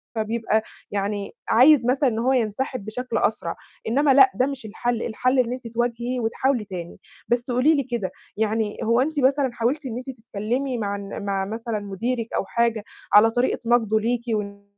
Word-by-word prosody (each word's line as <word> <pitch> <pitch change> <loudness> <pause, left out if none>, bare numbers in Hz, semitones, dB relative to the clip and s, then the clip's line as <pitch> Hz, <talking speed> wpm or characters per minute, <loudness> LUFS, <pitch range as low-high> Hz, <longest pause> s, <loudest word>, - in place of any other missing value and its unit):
فبيبقى 220 0 0 0.3
يعني، 200 0 -2 0.2
عايز 255 +1 +6
مثلًا 265 +1 +3
إن 225 0 -2
هو 260 +3 +2
ينسحب 240 -1 -1
بشكل 250 +4 -3
أسرع، - - 0 0.3
إنما 275 +4 +3
لأ 390 +6 +7
ده 255 - +2
مش 275 -5 -6
الحل، 235 +2 -2
الحل 255 +3 +1
إن 245 0 +1
أنتِ 250 -2 -7
تواجهي 240 +2 -2
وتحاولي 235 0 0
تاني، 175 -3 -7 0.3
بس 240 +1 0
قولي 260 +6 +4
لي 280 - +1
كده، 235 -7 -3 0.3
يعني 220 -1 0
هو 235 +3 +3
أنتِ 300 +1 -1
مثلًا 270 0 +3
حاولتِ 260 +6 -1
إن 235 -2 -4
أنتِ 255 +2 -7
تتكلّمي 240 +4 -2
مع 200 -2 -2
الن 200 0 -7
مع 195 -1 -1
مثلًا 225 +1 -3
مديرِك 225 +4 -3
أو - - 0
حاجة، 230 0 0 0.3
على 220 +2 +7
طريقة 245 +2 +1
نقده 225 -2 +3
ليكِ 235 +2 0
وإن 200 -1 -4
235 Hz, 180 wpm, -23 LUFS, 215-255 Hz, 0.3 s, لأ